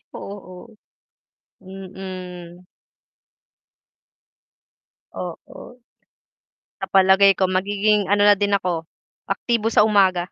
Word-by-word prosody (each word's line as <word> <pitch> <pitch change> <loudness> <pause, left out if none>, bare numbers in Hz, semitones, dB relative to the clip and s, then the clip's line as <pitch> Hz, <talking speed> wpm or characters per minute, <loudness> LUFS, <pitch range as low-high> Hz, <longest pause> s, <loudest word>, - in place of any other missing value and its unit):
Oo. 200 +2 -11 0.9
Mm. 185 -2 -10 2.5
Oo. 245 - -10 1.0
Sa - - -4
palagay 195 +1 +4
ko 190 - 0
magiging, 200 +2 0
ano, 205 0 +2
na 205 - +7
din 200 0 +1
ako 170 -4 -4 0.4
aktibo 230 -2 -1
sa 210 -2 +3
umaga. 190 -4 +2
195 Hz, 80 wpm, -21 LUFS, 185-205 Hz, 2.5 s, na